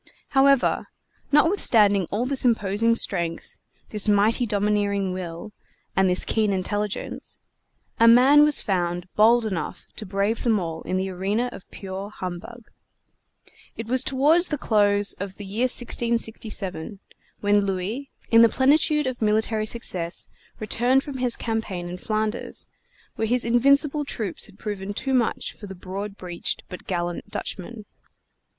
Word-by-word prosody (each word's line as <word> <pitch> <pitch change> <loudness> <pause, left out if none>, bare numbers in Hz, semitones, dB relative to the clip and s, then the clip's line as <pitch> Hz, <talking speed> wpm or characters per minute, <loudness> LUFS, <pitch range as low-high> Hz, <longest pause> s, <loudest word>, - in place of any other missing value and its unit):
However, 275 -1 +3 0.4
notwithstanding 225 - +4
all 220 +5 -1
this 270 0 +1
imposing 230 -1 +2
strength, 170 -7 -2 0.3
this 210 0 -1
mighty 215 +4 +3
domineering 205 -2 0
will, 180 +3 -7 0.4
and 190 -1 +3
this 180 - +1
keen 215 -2 +1
intelligence, 205 +2 -3 0.6
a 230 - +6
man 260 +5 +7
was 300 -1 +4
found 175 -2 -1
bold 230 +2 +5
enough 190 -6 -4
to 215 - -5
brave 200 +4 -1
them 225 -4 +2
all 165 -2 -5
in 185 - -1
the 190 0 -2
arena 200 +7 -1
of 190 - -12
pure 195 +1 -7
humbug. 190 +5 -8 1.1
It 225 - -5
was 255 +3 +2
toward 295 +7 +3
the 300 - 0
close 205 -4 +2
of 195 0 -6
the 205 - -9
year 215 +6 -1
1667, 225 -7 -2 0.4
when 205 0 +3
Louis, 200 +8 -3 0.2
in 230 0 +7
the 230 - +7
plenitude 300 +4 +2
of 255 -2 -4
military 215 0 +1
success, 180 -7 -3 0.3
returned 245 +5 +2
from 280 -2 -6
his 250 -2 0
campaign 220 -6 -3
in 180 +1 -7
Flanders, 215 +2 -2 0.5
where 220 - -1
his 245 +1 +1
invincible 280 +5 +3
troops 215 -10 -4
had 205 -2 -18
proven 205 -2 -5
too 265 +4 -2
much 245 -3 0
for 205 - -11
the 190 - -8
broad 195 +3 -6
breeched 175 -2 -3
but 180 - -10
gallant 175 -2 -3
Dutchmen. 210 +3 -6
210 Hz, 145 wpm, -24 LUFS, 190-240 Hz, 1.1 s, man